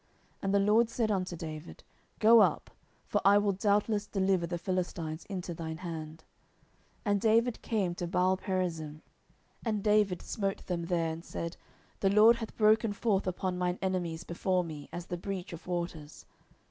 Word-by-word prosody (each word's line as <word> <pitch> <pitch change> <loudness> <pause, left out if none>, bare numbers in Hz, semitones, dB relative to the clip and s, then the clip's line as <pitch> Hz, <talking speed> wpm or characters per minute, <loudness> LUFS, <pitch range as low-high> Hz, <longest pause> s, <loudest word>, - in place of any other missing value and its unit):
And 195 - -1
the 200 - +4
LORD 215 +3 +4
said 230 -2 0
unto 185 -3 -1
David, 155 -1 -8 0.3
Go 225 +1 +7
up: - - +1 0.3
for - - 0
I 200 +1 +6
will 205 0 +2
doubtless 205 +2 +1
deliver 190 -3 +1
the 175 +1 -3
Philistines 170 -3 -3
into 185 -3 -5
thine 160 -1 -5
hand. 160 -2 -7 0.8
10:005:020 205 - +1
And 200 -1 +2
David 230 +2 +2
came 200 -6 0
to 175 0 -4
Baalperazim, 180 -4 -1 0.6
and 215 -3 -1
David 210 -4 +2
smote 195 -2 -3
them 170 -2 -2
there, 165 -2 0
and 165 +1 -8
said, 170 -1 -5 0.4
The 195 - +3
LORD 215 +4 +6
hath 225 -2 -7
broken 215 0 +4
forth 200 -2 0
upon 180 0 -2
mine 180 0 0
enemies 175 -3 -2
before 180 +1 0
me, 150 -4 -8
as 175 0 -6
the 175 - -4
breach 190 0 -5
of 170 - -10
waters. 170 -4 -5
185 Hz, 165 wpm, -31 LUFS, 170-205 Hz, 0.8 s, Go